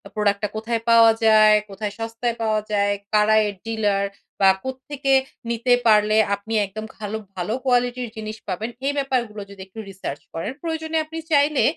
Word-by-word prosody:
product 205 -1 +1
টা - - +2
কোথায় 225 +1 -2
পাওয়া 230 -1 +7
যায়, 215 -1 +7
কোথায় 205 +1 -5
সস্তায় 225 +1 -2
পাওয়া 215 -1 +1
যায়, 205 -1 +2 0.2
কারা 215 +1 +4
এর 205 - -5
dealer 210 -3 0 0.4
বা 195 - +7
কোত্থেকে 270 +1 -2 0.4
নিতে 235 +2 +2
পারলে 215 0 +5 0.2
আপনি 205 +3 -8
একদম 215 +3 -7
খালো 215 0 -4 0.2
ভালো 180 +3 -2
কোয়ালিটির 245 -1 +1
জিনিস 215 0 -6
পাবেন, 205 +4 -3 0.2
এই 285 - +1
ব্যাপারগুলো 245 -6 -1
যদি 200 -1 -11
একটু 195 +4 -11
research 185 -7 -6
করেন। 165 +7 -3
প্রয়োজনে 320 -1 -2
আপনি 320 +1 -8
চাইলে 290 -1 +4
220 Hz, 165 wpm, -22 LUFS, 205-245 Hz, 0.4 s, পাওয়া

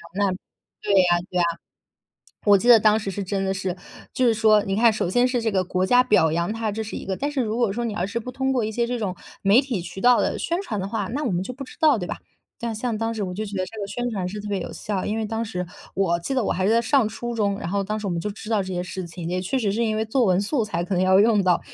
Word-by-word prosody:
那 200 -1 +2 0.5
对 205 - 0 0.2
啊 175 - +4
对 180 - -1
啊。 - - +4 1.0
我 205 -1 +7
记 225 - -2
得 240 -2 +9
当 215 0 +4
时 200 - -4
是 200 +1 -4
真 195 +1 -2
的 190 - 0
是 190 -2 -3 0.4
就 255 - +1
是 230 - +4
说 215 -1 +4
你 195 -2 -2
看 230 +2 +5
首 210 - -1
先 245 +6 +3
是 250 -1 -1
这 225 -1 0
个 190 -2 +1
国 185 +1 0
家 250 +5 +5
表 160 -9 +3
扬 170 +4 0
她 225 -1 -2
这 220 +2 -3
是 215 - -7
一 - - -5
个 190 - -2
但 285 +2 -2
是 285 -3 0
如 220 -1 -2
果 235 -4 +2
说 240 +3 -2
你 220 -3 -3
而 180 - -1
是 235 +4 -3
不 250 +2 -7
通 265 +1 -1
过 250 -3 +1
一 220 - -3
些 235 +2 0
这 245 0 -2
种， 195 -4 -2 0.3
媒 200 +4 +5
体 255 -9 -3
渠 175 +2 -8
道 245 0 +5
的 - - 0
宣 340 +3 -1
传 220 - -4
的 190 - -3
话， 210 -2 -2
那 275 +9 -3
我 245 - 0
们 180 0 0
就 210 - -5
不 270 +2 -8
知 255 - -13
道， 305 -5 +5
对 180 -4 -4
吧？ - - -4 0.5
但 230 -1 -2
像 230 +1 -2
当 225 +1 -1
时 215 -2 -3
我 180 -2 -4
就 210 +4 -3
觉 200 -1 -5
得 185 - 0
这 220 +4 -10
个 200 - -3
宣 245 +4 -3
传 190 -5 -2
是 210 +3 -6
特 210 - -7
别 200 -1 -1
有 - - -6
效， 200 -3 -3
因 215 - -1
为 220 - -1
当 225 +1 -2
时， 180 -5 -4 0.3
我 170 -3 +1
记 265 +11 -3
得 255 - +2
我 - - 0
还 185 +1 0
在 225 +2 +4
上 250 0 +3
初 240 +2 -5
中， 200 -3 0
然 - - -5
后 200 +1 0
当 210 +2 -3
时 210 - -6
我 - - -1
们 170 -1 -2
就 210 - -3
知 215 +1 -10
道 215 -2 +2
这 190 0 -5
些 180 0 -2
事 180 0 -6
情。 165 0 -7
也 180 +1 -1
确 260 +9 -1
实 210 -5 0
是 225 +4 0
因 215 -1 0
为 220 - 0
作 240 +3 +2
文 185 -2 +3
素 230 +4 0
材 190 -5 -2
可 180 - -3
能 180 - +2
要 190 +1 +5
用 210 -1 +4
到。 180 -2 +3
210 Hz, 340 characters per minute, -23 LUFS, 190-230 Hz, 1.0 s, 得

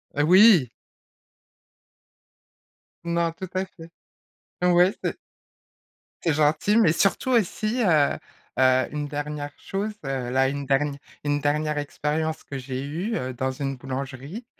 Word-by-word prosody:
Heu, 145 +1 +2
oui! 185 - +7 2.3
Non, 170 0 0
tout 185 +2 -8
à 185 +1 0
fait. 165 -3 -14 0.7
Ouais, 180 +2 +5
c'est - - -2 1.1
c'est 165 - +2
gentil, 155 +8 +2
mais 185 -9 +5
surtout 195 +8 +1
aussi 225 +1 +1
heu, 155 -7 +3 0.4
heu, 130 0 +4
une 150 -1 -3
dernière 145 0 -4
chose 205 +2 -3
heu. 130 -2 -3
Là, 130 +1 +3
une 140 0 -4
dernière 140 +1 +1 0.3
une 145 0 0
dernière 150 +1 0
expérience 150 +2 -2
que 140 - -7
j'ai 130 0 -5
eue, 175 +11 -3
heu, 130 0 -4
dans 130 +2 -2
une 135 +1 -3
boulangerie 135 - -6
150 Hz, 130 wpm, -25 LUFS, 135-180 Hz, 2.3 s, oui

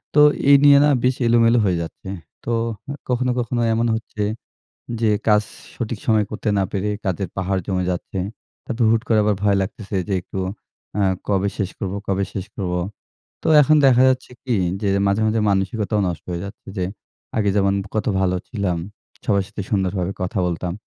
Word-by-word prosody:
তো 150 - +6 0.3
এই 140 - +10
নিয়ে 140 -1 +8
না 150 - +5
বেশ 125 0 +2
এলোমেলো 115 0 +5
হয়ে 90 -3 +2
যাচ্ছে। 85 +3 -9 0.4
তো 120 - -2 0.4
এ - - -2 0.2
কখনো, 125 0 +1
কখনো, 120 0 -1
এমন 115 +1 +1
হচ্ছে 110 -1 -4 0.8
যে 110 - +3 0.2
কাজ 105 0 +5 0.3
সঠিক 115 -3 -4
সময়ে 110 -2 +3
করতে 105 0 -2
না 95 - +3
পেরে 100 +1 -1 0.2
কাজের 95 -1 -1
পাহাড় 95 0 0
জমে 95 -2 0
যাচ্ছে। 90 +2 -4 0.5
তারপর 120 -1 -1
হুট 115 -1 +3
করে 110 -2 +4
আবার 105 -1 +2
ভয় 100 -1 +4
লাগতেছে, 100 +1 -5
"যে 100 - -1
একটু 95 - -6 0.6
আ - - +2 0.3
কবে 100 0 +1
শেষ 100 -3 -1
করবো 100 0 -3
কবে 100 0 +1
শেষ 95 -1 -4
করবো?" 90 -2 -2 0.6
তো - - -2
এখন 155 +2 +5
দেখা 130 -1 +6
যাচ্ছে 130 -1 -1
কি 125 -3 0 0.3
যে 100 - 0 0.2
মাঝে, 100 +2 +1
মাঝে, 110 +1 +1
মানসিকতাও 100 +2 0
নষ্ট 85 -2 -5
হয়ে 85 0 -3
যাচ্ছে। 100 - -11
যে 90 - 0 0.5
আগে 105 -2 +2
যেমন 100 -1 +3 0.2
কত 110 - 0
ভালো 90 -1 +2
ছিলাম, 100 -7 -1 0.5
সবার 100 -2 +2
সাথে 105 0 -6
সুন্দরভাবে 95 -2 0
কথা 90 +2 -1
বলতাম। 85 0 -3
100 Hz, 180 wpm, -21 LUFS, 95-115 Hz, 0.8 s, এই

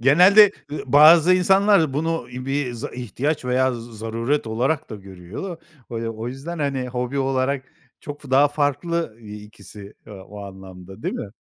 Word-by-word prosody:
Genelde, 185 - +6 0.2
ııı, - - -4
bazı 160 +6 +7
insanlar 190 -4 +3
bunu 165 +3 -2
bir 130 +1 -3
z 115 - -8
ihtiyaç 130 +4 -3
veya 130 0 +1
z 115 -2 -10
zaruret 115 +5 -2
olarak 125 +7 -1
da - - -5
görüyor 95 - -10
da. 175 -4 -6 0.3
Böyle 115 0 -4
o 115 +2 -6
yüzden, 150 +7 -7
hani, 135 -3 -2
hobi 125 +2 -3
olarak 135 0 -1 0.4
çok 145 0 -9
f 140 - -12
daha 140 +2 +5
farklı 145 -1 -2
i 105 -1 -10
ikisi, 100 -1 -13
ııı, 100 -3 -11
o 105 0 -11
anlamda, 95 +1 -12
değil - - -2
mi? 100 - -5
130 Hz, 170 wpm, -22 LUFS, 110-150 Hz, 0.4 s, bazı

